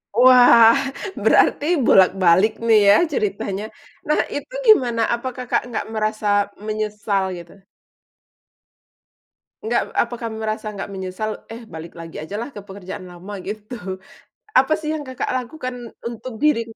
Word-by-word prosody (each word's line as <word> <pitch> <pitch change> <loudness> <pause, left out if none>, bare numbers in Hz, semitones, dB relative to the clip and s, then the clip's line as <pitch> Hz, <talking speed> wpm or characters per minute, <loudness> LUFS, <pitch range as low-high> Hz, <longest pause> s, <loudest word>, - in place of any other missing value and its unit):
Wah, 245 -1 +7 0.4
berarti 290 - +3 0.2
bolak-balik 185 +1 +5
nih 225 -2 +5
ya 205 - +8 0.2
ceritanya. 200 -2 -2 0.4
Nah, 300 - +2 0.2
itu 385 +12 -6
gimana, 245 - +5
apa 235 +2 -3
Kakak 250 -1 -1
nggak 235 - -4
merasa 215 0 -2 0.4
menyesal, 210 -2 -1
gitu? 170 +3 -13 2.1
Nggak 235 +2 +1 0.2
apakah 235 -1 -1
merasa 220 -1 -4
nggak 200 -1 -6
menyesal, 190 +3 -4 0.2
"Eh, 230 +1 -9
balik 160 +1 -8
lagi 165 -2 -8
aja 180 +6 -7
lah 240 - -5
ke 205 - -8
pekerjaan 190 -1 -8
lama", 180 +4 -10
gitu. 215 +3 -7 0.8
Apa 270 +4 +4
sih 310 -1 -5
yang 310 - -3
Kakak 260 0 -3
lakukan 255 0 -4 0.3
untuk 235 +1 -6
diri? 300 -4 +2
220 Hz, 130 wpm, -21 LUFS, 200-245 Hz, 2.1 s, ya